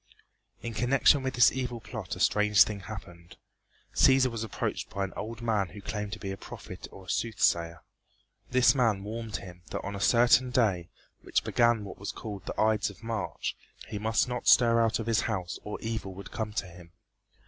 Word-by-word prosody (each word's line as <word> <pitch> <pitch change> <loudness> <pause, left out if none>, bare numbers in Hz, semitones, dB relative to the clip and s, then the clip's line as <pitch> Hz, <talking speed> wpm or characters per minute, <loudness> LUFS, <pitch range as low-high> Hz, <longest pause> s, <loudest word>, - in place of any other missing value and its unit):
In 115 - -4
connection 135 +5 +4
with 130 0 -3
this 120 - +6
evil 125 -2 -3
plot 105 -4 -6
a - - -10
strange 105 0 +5
thing 105 -2 -5
happened. 90 -4 -10 0.6
Cæsar 130 -1 +5
was 115 -1 -4
approached 110 - -3
by 100 - -3
an 95 - -4
old 115 +1 -6
man 105 -4 +1
who 105 - -11
claimed 105 0 -4
to 110 - -6
be 95 - -4
a 95 - -5
prophet - - -9
or 95 - -12
a - - -12
soothsayer. 85 -7 0 0.7
This 125 0 +5
man 115 -7 +1
warned 110 0 -5
him 90 -2 -8
that - - -4
on 100 - -5
a - - -5
certain 120 +4 +5
day, 100 -9 +1 0.3
which - - 0
began 120 -2 +2
what 100 - -9
was 100 - -4
called 105 -3 -8
the - - -5
Ides 110 -1 +2
of 100 +2 -14
March, 115 -3 -3 0.3
he 105 - -4
must 110 +3 +1
not 125 -1 -4
stir 115 -1 +6
out 115 -1 +2
of 115 - -4
his 115 -1 +2
house 90 -6 -3
or 105 - -5
evil 110 -4 -4
would 100 0 -10
come 110 -1 -3
to 105 - -2
him. 85 -1 -14
110 Hz, 200 wpm, -29 LUFS, 100-115 Hz, 0.7 s, this